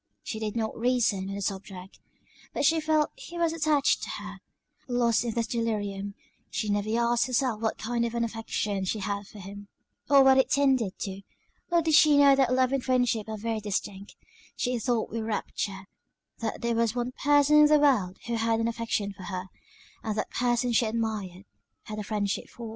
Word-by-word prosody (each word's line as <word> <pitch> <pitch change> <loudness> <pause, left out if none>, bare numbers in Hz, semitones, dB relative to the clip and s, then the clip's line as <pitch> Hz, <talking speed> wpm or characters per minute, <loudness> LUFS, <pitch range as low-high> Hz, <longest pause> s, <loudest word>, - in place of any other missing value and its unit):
She 220 - -5
did 215 -1 -3
not 220 -1 -2
reason 225 -5 +1
on 195 - -4
the 200 - -4
subject; 190 -1 -6 0.6
but - - +1
she 325 +3 +4
felt 310 -1 +2
he 425 -9 -9
was 335 -1 +1
attached 305 -3 +2
to - - -5
her: - - -7 0.5
lost 240 -3 +2
in 235 -2 -3
this 230 -1 0
delirium, 205 -4 -3 0.3
she 210 +1 -3
never 205 +1 0
asked 235 +1 +2
herself 250 -3 0
what 220 - -1
kind 235 +1 -1
of 235 0 -2
an 235 - +1
affection 220 -3 -2
she 190 +4 -1
had 200 -1 -3
for 210 - -14
him, 200 +1 -9 0.4
or 280 -1 +7
what 265 0 +6
it 265 - +3
tended 265 -8 +2
to; 195 0 -5 0.5
nor 340 -1 +3
did 320 0 +1
she 300 -1 +6
know 280 -1 +7
that 265 -3 +2
love 255 0 +2
and 270 -2 0
friendship 245 -4 +1
are 220 - -4
very 225 +1 -2
distinct; 200 -1 -4 0.4
she 250 -1 -1
thought 235 0 -1
with 230 0 -3
rapture, 200 -3 -3 0.5
that 225 -2 -4
there 235 0 0
was 230 0 +1
one 245 0 -2
person 290 +2 +4
in 300 - +8
the 300 0 +5
world 240 -11 +2
who 235 -1 -2
had 225 0 +1
an 230 - +1
affection 225 -3 -2
for 190 -1 -11
her, 185 0 -5 0.5
and 215 -2 -3
that - - -2
person 245 0 +1
she 230 0 +3
admired 215 -4 -3 0.4
had 215 0 -6
a - - -3
friendship 205 -1 -2
for. 235 -2 -8
230 Hz, 200 wpm, -27 LUFS, 205-255 Hz, 0.6 s, in